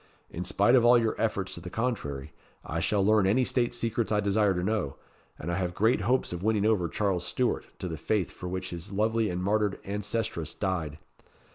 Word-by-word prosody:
In 90 +2 -5
spite 100 +5 +3
of 125 -3 +6
all 120 +1 +7
your 115 -2 +1
efforts 100 -4 -1
to 85 - -6
the 90 - -7
contrary, 95 - -3 0.3
I 80 - -2
shall 100 +3 +1
learn 105 -2 +4
any 125 +6 +3
state 120 -1 +1
secrets 115 -1 -1
I 105 - +3
desire 100 -1 +2
to 90 - -1
know, 95 -9 -1 0.4
and 85 - -4
I 85 - -1
have 90 -2 -2
great 110 +1 +3
hopes 125 0 +1
of 85 - -4
winning 105 0 +1
over 105 -6 +2
Charles 95 -3 0
Stuart 125 +7 -1
to 95 - -4
the 80 -2 -4
faith 100 +4 0
for 90 - -7
which 95 0 -4
his 85 +3 -6
lovely 110 +2 +1
and 90 0 -3
martyred 105 0 +1
ancestress 100 -5 -3
died. 85 -7 -2
100 Hz, 210 wpm, -28 LUFS, 90-110 Hz, 0.4 s, all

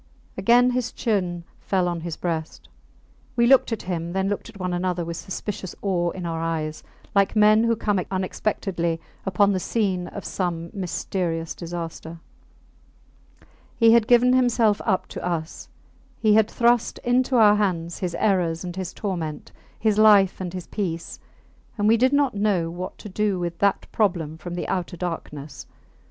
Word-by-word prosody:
Again 240 +6 +4
his 250 -1 -1
chin 180 -6 -1 0.2
fell 185 -2 0
on 170 -1 -2
his 170 -1 -5
breast. 160 -2 -4 0.7
We 235 - +4
looked 260 0 +5
at 225 - -3
him, 170 -2 -3
then 190 +1 0
looked 205 +2 -3
at 210 -3 -13
one 180 -1 -2
another 175 -1 -1
with 170 0 -4
suspicious 190 0 -6
awe 175 -3 +1
in 180 0 -6
our 165 -1 -3
eyes, 155 -2 -3 0.3
like 200 +1 +2
men 215 +1 +5
who 230 0 +2
come 205 -3 0
unexpectedly 185 -3 -2 0.3
upon 200 +2 +3
the 185 - 0
scene 185 -3 -1
of 205 - -8
some 170 -3 -3
mysterious 175 -3 -3
disaster. 170 -1 -7 1.6
He 230 -2 +6
had 230 -1 +5
given 245 +1 +5
himself 240 -4 +3
up 190 -4 +1
to - - -7
us; 170 -2 -4 0.5
he 215 -2 +4
had 220 0 +4
thrust 240 0 +2
into 255 +2 +2
our 210 -3 +6
hands 175 -5 -1
his 180 -2 -3
errors 175 -5 +1
and 175 -1 -6
his 185 -1 -5
torment, 170 -7 -4 0.3
his 215 -1 +2
life 205 -4 +5
and 180 -2 -4
his 180 -1 -6
peace; 170 -5 -4 0.6
and 205 0 +1
we 225 - +6
did 255 +3 +3
not 285 -3 +2
know 200 -5 0
what 180 +2 -6
to - - -9
do 205 0 0
with 170 -1 -4
that 200 -1 +2
problem 170 -7 0
from 175 +2 -6
the 175 - -3
outer 180 -1 -3
darkness. 150 -5 -6
185 Hz, 165 wpm, -24 LUFS, 170-215 Hz, 1.6 s, He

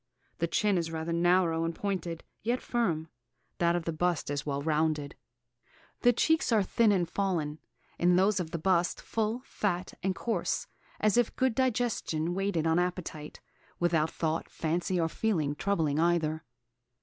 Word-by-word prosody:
The 170 - +1
chin 200 +1 +2
is 165 -1 -2
rather 160 +1 -3
narrow 170 -1 +3
and 165 0 -2
pointed, 175 -4 -3 0.2
yet 240 +3 0
firm; 170 -10 -1 0.5
that 170 0 +3
of 175 -2 -2
the 165 - -1
bust 170 -2 0 0.2
well 140 -1 -1
rounded. 155 -2 0 0.9
The 245 - +5
cheeks 320 +4 +2
are 215 -3 +4
thin 220 +3 +3
and 180 -4 +2
fallen; 165 -6 -1 0.4
in 175 +1 +4
those 195 +2 +3
of 170 -3 -3
the 170 - -3
bust 175 +1 +1
full, 225 +3 -2
fat, 185 -3 -2
and 190 0 0
coarse, 220 -8 -1 0.3
as 215 +2 +3
if 240 -2 +2
'good 260 -2 +2
digestion 225 -10 0
waited 195 -4 0
on 165 +1 +3
appetite,' 175 -4 -4 0.4
without 160 -2 +2
thought, 160 0 -2
fancy, 175 +3 -1
or 165 - +2
feeling, 165 -6 0
troubling 155 -4 0
either. 160 -2 +1
175 Hz, 155 wpm, -30 LUFS, 160-200 Hz, 0.9 s, The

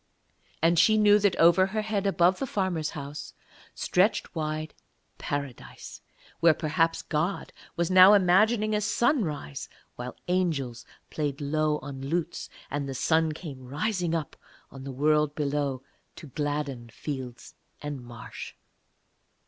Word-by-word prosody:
And 165 0 +4
she 215 +6 +5
knew 210 -1 +6
that 200 -2 +2
over 170 +3 +5
her 215 +2 -2
head 210 -2 -1
above 185 -1 +3
the 270 - -2
farmer's 185 -8 -1
house 145 +1 -7 0.4
stretched 190 +5 +1
wide 155 -1 -3 0.5
Paradise, 140 -3 -6 0.4
where 165 -1 +5
perhaps 165 +2 0
God 160 +6 -2 0.2
was 170 +1 0
now 185 +2 +9
imagining 215 +4 +3
a 210 - +1
sunrise 205 - -1 0.3
while 125 +1 -6
angels 155 -10 -1 0.2
played 145 -3 -2
low 155 +1 0
on 135 -1 -7
lutes, 165 +5 -3 0.2
and 140 -1 -2
the 135 - -4
sun 160 +3 +2
came 150 -4 -8
rising 170 - -1
up 155 -3 -4 0.4
on 135 0 -10
the 135 - -5
world 150 +2 +2
below 140 -3 -1 0.3
to - - -10
gladden 145 -4 -3
fields 130 -1 -7 0.3
and 145 -3 -5
marsh. 120 -1 -9
155 Hz, 130 wpm, -27 LUFS, 140-185 Hz, 0.5 s, now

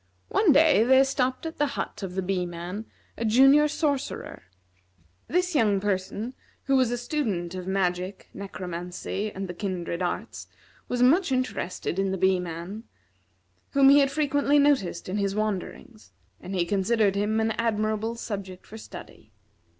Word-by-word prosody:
One 405 -6 +4
day, 290 -6 +5
there 265 +2 +6
stopped 260 0 -1
at 325 -2 -6
the 295 - +3
hut - - -4
of 185 -2 -5
the 190 - -1
Bee 180 -1 -1
man 175 +5 -6 0.3
a - - -1
Junior 270 +7 +6
Sorcerer. 285 - -3 0.8
This 360 +2 0
young 215 -8 +3
person, 200 +4 -2 0.3
who 275 - +1
was 255 -3 +3
a 245 - -1
student 220 - -2
of 185 -1 -6
magic, 185 0 -1
necromancy, 185 +1 -5
and 195 0 -5
the 180 - -6
kindred 175 -2 -4
arts, 180 - -4 0.4
was 245 0 0
much 315 +5 +4
interested 250 -8 -2
in 195 0 +1
the 190 - -2
Bee 190 0 +3
man, 180 +5 -6 0.9
whom 275 -1 +6
he 285 +1 +7
had 275 -1 +3
frequently 285 0 +2
noticed 275 -12 +2
in 185 +3 -2
his 200 -1 -1
wanderings, 215 - -4 0.3
and 190 +2 -6
he 175 -2 +1
considered 200 +2 +2
him 210 +2 0
an 220 0 +1
admirable 220 0 -1
subject 195 -5 -6
for 220 - -10
study. - - -12
210 Hz, 160 wpm, -26 LUFS, 185-265 Hz, 0.9 s, he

